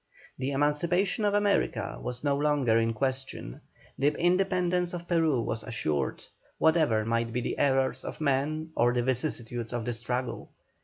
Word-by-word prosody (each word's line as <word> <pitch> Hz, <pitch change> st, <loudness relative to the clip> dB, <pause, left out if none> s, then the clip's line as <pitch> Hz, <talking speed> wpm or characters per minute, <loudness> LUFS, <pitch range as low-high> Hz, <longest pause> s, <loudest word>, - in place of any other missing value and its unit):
The 130 Hz, +1 st, -1 dB
emancipation 170 Hz, +8 st, +1 dB
of 205 Hz, 0 st, +2 dB
America 205 Hz, -1 st, +1 dB
was 125 Hz, +1 st, -4 dB
no 140 Hz, -1 st, +2 dB
longer 140 Hz, -6 st, +2 dB
in 115 Hz, 0 st, +1 dB
question, 130 Hz, -, -3 dB, 0.4 s
the 140 Hz, -, +3 dB
independence 180 Hz, 0 st, +1 dB
of 175 Hz, 0 st, -7 dB
Peru 160 Hz, -7 st, +2 dB
was 110 Hz, 0 st, -2 dB
assured, 75 Hz, -, -2 dB, 0.3 s
whatever 155 Hz, -10 st, +3 dB
might 115 Hz, 0 st, 0 dB
be 125 Hz, -, -1 dB
the -, -, -3 dB
errors 135 Hz, -2 st, +2 dB
of -, -, -6 dB
men 155 Hz, +2 st, 0 dB
or 120 Hz, +1 st, +3 dB
the 120 Hz, -1 st, +1 dB
vicissitudes 120 Hz, -3 st, -2 dB
of 120 Hz, -2 st, -2 dB
the 120 Hz, -, -1 dB
struggle. 125 Hz, +2 st, -3 dB
135 Hz, 155 wpm, -28 LUFS, 120-160 Hz, 0.4 s, the